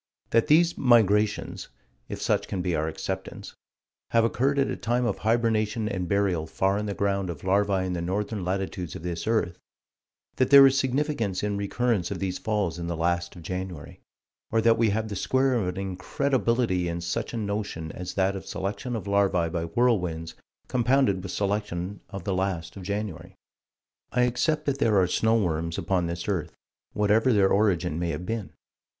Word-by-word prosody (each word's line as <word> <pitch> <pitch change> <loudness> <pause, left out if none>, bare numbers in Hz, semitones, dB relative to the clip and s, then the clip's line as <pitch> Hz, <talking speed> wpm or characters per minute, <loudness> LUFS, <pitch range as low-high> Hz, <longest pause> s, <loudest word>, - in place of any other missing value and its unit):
That 115 +5 +3
these 165 +3 +4
"migrations" 105 -4 +2 0.4
if - - -5
such - - 0
can 90 -2 -3
be 90 -2 0
our 80 0 0
acceptance 80 - -5 0.6
have 115 -1 +3
occurred 135 +4 +1
at 140 - +2
a - - -2
time 120 +1 0
of - - -1
hibernation 110 -1 +1
and 95 -4 -2
burial 95 -5 +1
far 95 +4 0
in 105 - -3
the 100 - -3
ground 100 -2 0
of 80 -4 -6
larvae 95 0 +2
in 90 - -2
the 85 - -2
northern 100 +3 -2
latitudes 90 -2 -3
of - - -8
this 85 +2 -4
earth; 110 -7 0 0.8
that 130 - +2
there 140 0 +10
is 135 0 +5
significance 130 -7 0
in 105 -1 0
recurrence 100 -1 0
of - - -3
these 95 -2 -3
falls 105 -6 -1
in 85 - -4
the 85 -1 -3
last 85 +2 -1
of 85 - -11
January 90 -3 -6 0.5
or 115 - +2
that 115 0 +4
we 115 -1 +2
have 110 +2 -1
the 105 - -5
square 130 +6 +1
of 110 -7 0
an 90 - -3
incredibility 115 - 0
in 85 0 -3
such 85 +7 -3
a 115 - -4
notion 100 -7 -3
as 90 0 -7
that 95 0 +1
of 95 - -6
selection 100 +6 -3
of 110 - -4
larvae 100 -4 +2
by 85 0 -2
whirlwinds, 90 -5 0 0.3
compounded 125 -5 +2
with 95 - -6
selection 100 -2 -2
of 100 -3 -7
the 100 - -1
last 95 -3 -2
of 100 - -8
January. 95 -2 -5 0.8
I 125 - +2
accept 125 +6 +1
that 140 -1 -1
there 110 -7 +3
are 95 - +4
"snow 110 +5 +2
worms" 85 -3 -1
upon 90 -3 0
this 85 0 -4
earth 95 -6 -2 0.4
whatever 105 +4 +3
their 100 -4 +4
origin 90 -5 +1
may 85 -1 -1
have 85 +3 -4
been. 110 0 -3
100 Hz, 185 wpm, -26 LUFS, 90-115 Hz, 0.8 s, there